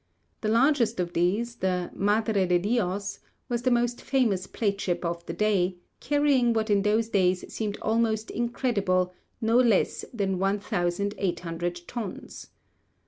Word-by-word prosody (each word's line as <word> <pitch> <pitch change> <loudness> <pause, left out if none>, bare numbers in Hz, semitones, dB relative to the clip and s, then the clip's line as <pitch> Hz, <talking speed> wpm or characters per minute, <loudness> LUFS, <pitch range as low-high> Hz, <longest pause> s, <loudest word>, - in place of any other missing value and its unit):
The 215 - -1
largest 235 -1 +3
of 175 -1 -2
these, 210 +8 0
the 180 -3 -1
'Madre 205 -1 +1
de 180 0 +4
Dios,' 200 0 -1 0.3
was 240 -1 -1
the 255 - +2
most 240 0 +1
famous 225 -9 +1
plate 200 -3 -1
ship 175 -1 -1
of 170 0 -3
the 165 - -3
day, 185 -1 +1 0.2
carrying 280 -4 +2
what 220 -1 0
in 200 -1 +4
those 215 +2 +2
days 185 -3 +2
seemed 210 -2 -3
almost 220 -1 0
incredible, 205 -7 0 0.3
no 225 +1 +3
less 235 -6 +3
than 195 -5 -1
1,800 175 -3 -1
tons. 225 -6 -7
205 Hz, 140 wpm, -27 LUFS, 185-235 Hz, 0.3 s, de